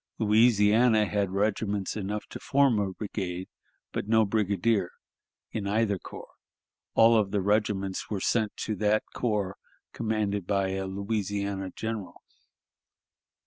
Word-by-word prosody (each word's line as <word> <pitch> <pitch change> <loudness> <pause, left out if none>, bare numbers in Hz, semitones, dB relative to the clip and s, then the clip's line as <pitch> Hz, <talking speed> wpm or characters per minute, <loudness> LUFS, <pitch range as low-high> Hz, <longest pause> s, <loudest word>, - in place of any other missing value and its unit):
Louisiana 110 0 +4
had 100 -2 0
regiments 100 0 -1
enough 105 0 -3
to - - -6
form 135 -5 +3
a 100 -2 -1
brigade, 95 -2 -5 0.4
but - - -3
no 110 0 +4
brigadier 100 -1 +1 0.6
in 105 -3 -3
either 105 -1 +1
corps; - - -11 0.6
all 115 +1 +6
of 105 -3 +2
the 100 +1 0
regiments 100 -1 0
were 105 - -2
sent 110 +2 0
to 110 - -1
that 105 0 +2
corps 105 -5 -1 0.4
commanded 105 -4 -1
by 100 -2 +1
a 95 0 -3
Louisiana 100 -1 -2
general. 110 -4 -5
105 Hz, 125 wpm, -28 LUFS, 100-110 Hz, 0.6 s, all